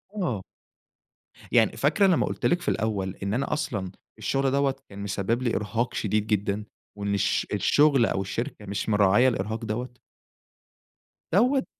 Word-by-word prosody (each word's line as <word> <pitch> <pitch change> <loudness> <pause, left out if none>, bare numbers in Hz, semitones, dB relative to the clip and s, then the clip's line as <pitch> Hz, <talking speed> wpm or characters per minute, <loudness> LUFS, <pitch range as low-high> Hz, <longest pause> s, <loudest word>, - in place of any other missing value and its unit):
آه. 130 - -1 1.1
يعني - - +4
فاكرة 155 +8 +3
لمّا 185 -4 +3
قُلت - - -2
لِك 175 +1 +2
في 175 - -6
الأول 100 -4 -1
إن 100 +1 -1
أنا 135 +3 -1
أصلًا 110 -11 -2 0.3
الشغل 135 +6 0
دوَّة 140 0 +2
كان 100 - -11
مسبِّب 100 +4 -1
لي 120 -2 0
إرهاق 115 +3 -2
شديد 105 0 0
جدًا، 105 -1 0 0.3
وإن 100 0 -1
الش 100 - +1
الشغل 145 -5 +4
أو 95 - -1
الشركة 110 +3 -5
مش 100 +2 -3
مراعية 105 +4 +4
الإرهاق 110 0 -2
دوَّة؟ 120 +3 -5 1.3
دوَّة. 265 +2 +3
110 Hz, 150 wpm, -26 LUFS, 100-135 Hz, 1.3 s, يعني